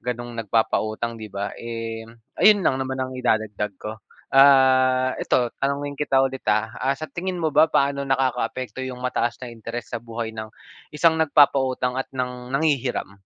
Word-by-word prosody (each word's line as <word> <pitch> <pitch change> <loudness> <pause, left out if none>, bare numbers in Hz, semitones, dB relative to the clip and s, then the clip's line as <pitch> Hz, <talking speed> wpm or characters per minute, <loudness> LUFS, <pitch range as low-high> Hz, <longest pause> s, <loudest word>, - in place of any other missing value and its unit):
gano'ng 120 -1 -4
nagpapautang, 110 +1 -1
'di 110 - -7
ba. 100 +1 -4
Eh, 115 -1 -6 0.3
ayun 205 -3 +6
lang 130 0 +2
naman 130 0 -3
ang 130 0 -3
idadagdag 110 -5 -1
ko. 110 +2 -8 0.3
Ah, 130 -1 +5
ito 120 -2 +1
tanungin 140 +1 -1
kita 135 -2 +2
ulit, 135 0 -3
ah, 110 +2 +1
ah, 135 +2 0
sa 155 - -6
tingin 180 +3 -4
mo 160 -3 -1
ba, 155 +2 +5
paano 140 -2 +1
nakakaapekto 130 -2 -1
'yong 130 -1 -5
mataas 120 -1 -1
na 120 - -8
interes 115 0 -7
sa 120 - -3
buhay 115 -1 -5
ng, 110 0 -7 0.4
isang 160 +1 +2
nagpapautang 130 -4 +3
at - - -6
ng 125 -1 -4
nanghihiram? 135 -9 -1
130 Hz, 165 wpm, -23 LUFS, 115-135 Hz, 0.4 s, ayun